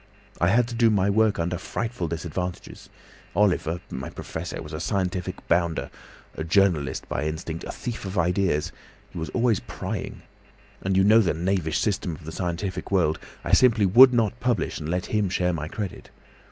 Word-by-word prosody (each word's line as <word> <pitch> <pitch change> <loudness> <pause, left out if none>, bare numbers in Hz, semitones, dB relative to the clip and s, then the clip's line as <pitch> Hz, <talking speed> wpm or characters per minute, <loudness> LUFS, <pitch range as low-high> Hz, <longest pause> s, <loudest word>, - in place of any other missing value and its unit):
I 85 - +3
had 115 +5 +3
to - - -6
do 115 -1 +4
my 100 -2 +2
work 110 0 +3
under 85 +1 -1
frightful 115 -7 -3
disadvantages. 85 +2 -5 0.5
Oliver, 90 -4 +2
my 65 - -5
professor, - - -6
was - - -8
a - - -3
scientific 90 -2 -2
bounder, 85 -1 +1 0.4
a 80 - -3
journalist 80 -6 +1
by 70 - -2
instinct, 80 +1 -4
a - - -5
thief 120 -2 -5
of 95 0 -5
ideas—he 90 -3 -2
was 80 - -4
always 120 -4 +2
prying! - - -6 0.6
And 95 0 0
you 95 - +5
know 110 +3 +6
the 95 -7 +2
knavish 85 -2 0
system 95 -5 -1
of 75 - -14
the 80 - -6
scientific 90 +2 -3
world. 85 -5 +2 0.2
I - - -3
simply 115 -5 +5
would 125 +7 +8
not 115 -1 +1
publish, 125 -7 0
and 75 0 -5
let 90 +1 -1
him 105 -3 0
share 90 -1 +1
my 75 -2 -3
credit. 100 +2 -6
90 Hz, 175 wpm, -25 LUFS, 85-105 Hz, 0.6 s, would